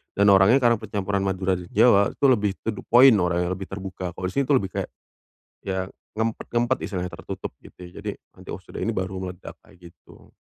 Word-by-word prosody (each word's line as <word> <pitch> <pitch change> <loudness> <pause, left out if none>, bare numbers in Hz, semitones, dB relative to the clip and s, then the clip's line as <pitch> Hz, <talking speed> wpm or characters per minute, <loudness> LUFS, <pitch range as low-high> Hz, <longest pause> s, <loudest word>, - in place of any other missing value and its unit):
Dan 100 0 +5
orangnya 95 +6 +6
karena 120 -1 +4
percampuran 100 -2 -2
Madura 95 0 0
dan 90 - -10
Jawa 100 -2 +5
itu - - 0
lebih 105 -5 +2
to - - -2
the 105 - -8
point 125 +1 +7
orangnya 90 0 0
lebih 95 +1 -5
terbuka. 95 -2 -6
Kalau - - -9
di - - -5
sini 140 - +1
tu 140 - +4
lebih 100 -7 0
kayak - - -3 0.8
ya 95 -1 -2 0.3
ngempet-ngempet 120 +2 0
istilahnya, 90 -3 -3
tertutup - - -7
gitu - - -16
ya. 90 +3 -12
Jadi 105 - -2 0.2
nanti, 95 0 -15
"Oh - - -5
sudah 90 - -8
ini - - 0
baru 95 -3 -3
meledak," 90 -1 -8
kayak 95 -4 -21
gitu. 85 - -20
95 Hz, 205 wpm, -24 LUFS, 95-110 Hz, 0.8 s, point